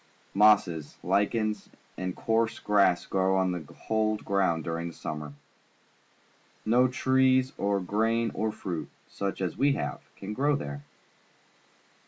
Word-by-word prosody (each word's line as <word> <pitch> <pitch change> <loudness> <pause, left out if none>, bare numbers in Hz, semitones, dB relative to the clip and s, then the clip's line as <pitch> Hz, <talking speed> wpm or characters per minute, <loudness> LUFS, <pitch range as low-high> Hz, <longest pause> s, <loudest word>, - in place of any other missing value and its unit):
Mosses, 95 -7 +3
lichens, 105 0 0 0.3
and 90 -1 -4
coarse 115 0 0
grass 100 -4 +3
grow 95 0 +1
on 95 -1 +2
the 90 - -2 0.3
cold 110 -1 0
ground 95 -5 +1
during 85 +1 -3
the 85 - -8
summer. 75 -1 -6 1.3
No 125 +3 +4
trees 130 0 +2
or 100 0 0
grain 115 +5 0
or 110 0 -1
fruit, 85 -7 -5 0.2
such 100 -1 -4
as 90 - -2
we 140 +1 +4
have, - - -3 0.2
can 100 +2 -6
grow 145 +5 +2
there. 70 - -5
100 Hz, 130 wpm, -28 LUFS, 90-115 Hz, 1.3 s, No